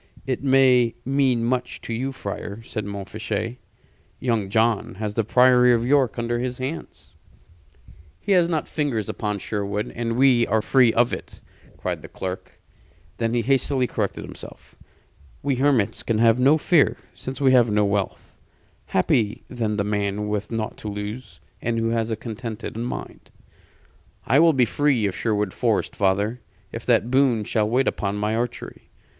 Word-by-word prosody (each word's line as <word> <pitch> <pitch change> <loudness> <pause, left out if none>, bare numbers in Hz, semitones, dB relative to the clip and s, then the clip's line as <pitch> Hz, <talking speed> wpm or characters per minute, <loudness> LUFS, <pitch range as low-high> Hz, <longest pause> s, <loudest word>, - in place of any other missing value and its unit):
"It 130 0 -2
may 130 -3 +4
mean 130 -3 +2
much 125 +1 -2
to 115 - -5
you, 130 +4 -2
friar," 105 -2 -6
said 110 -2 -5
Montfichet. 110 +3 -4 0.6
"Young 115 -6 -1
John 110 -1 +1
has 105 +1 -4
the 115 - 0
Priory 125 +2 +5
of 115 0 -1
York 135 -3 +2
under 120 0 -1
his 125 0 -3
hands." 135 +6 -7 1.1
"He 200 - -3
has 175 -3 +4
not 160 -3 -1
fingers 135 - -2
upon 105 -2 -2
Sherwood, 105 +1 -3
and 115 0 -2
we 125 -3 +4
are 110 +1 +1
free 125 -2 +4
of 120 +2 +2
it!" - - -7 0.4
cried - - -3
the - - -10
clerk. 95 0 -7 0.6
Then 115 0 -1
he 120 - +1
hastily 135 0 +2
corrected - - -3
himself. - - -12 0.7
"We 140 -3 0
hermits 130 -6 +2
can 115 - -1
have 115 +1 +4
no 140 +5 +5
fear, 160 -1 +3 0.2
since 130 +1 -7
we 135 -2 +4
have 120 -3 +5
no 105 0 +2
wealth. 100 -1 -3 0.5
Happy 105 -3 +1
then 115 -4 -2
the 100 - 0
man 105 0 -1
with 105 +1 -3
naught 110 -1 -3
to - - -8
lose, 105 -2 -6 0.2
and 115 0 -1
who 115 0 0
has 115 -1 0
a 110 - -1
contented 115 0 -6
mind." 120 +2 -6 1.0
"I 135 +6 +4
will 165 0 +6
be 130 -3 +4
free 135 -2 +1
of 95 -2 -1
Sherwood 105 -4 -1
Forest, 115 -4 0
father, 100 +5 0 0.3
if - - -7
that 120 - +2
boon 130 -5 +3
shall 105 0 0
wait 130 +3 +2
upon 100 0 -1
my 105 +1 -1
archery. 120 +1 -5
115 Hz, 165 wpm, -23 LUFS, 105-130 Hz, 1.1 s, will